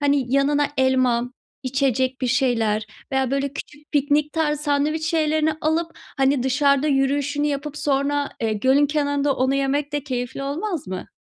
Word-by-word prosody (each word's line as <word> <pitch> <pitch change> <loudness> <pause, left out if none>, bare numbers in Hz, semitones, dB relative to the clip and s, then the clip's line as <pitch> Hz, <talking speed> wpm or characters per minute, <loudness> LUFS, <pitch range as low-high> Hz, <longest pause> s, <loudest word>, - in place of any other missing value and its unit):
Hani, 280 -3 +1
yanına 285 +1 +3
elma, 255 -2 +2 0.3
içecek 260 -1 0
bir 255 - 0
şeyler 225 -5 +1 0.3
veya 265 -1 +1
böyle, 275 0 -1
küçük, 295 +2 -10
piknik 290 +1 +1
tarzı 300 -2 0
sandviç 300 +2 0
şeylerini 315 -1 +1
alıp, 325 +2 0 0.3
hani, 270 -1 +2
dışarıda 280 +2 +2
yürüyüşünü 285 +1 +1
yapıp 290 +1 -3
sonra, 285 0 0
eee, 220 -1 0
gölün 265 +7 +3
kenarında 285 -1 0
onu 260 +1 +1
yemek 280 +2 0
de 290 -1 -2
keyifli 250 0 -4
olmaz 315 - -3
mı? 185 0 -6
280 Hz, 150 wpm, -22 LUFS, 260-295 Hz, 0.3 s, yanına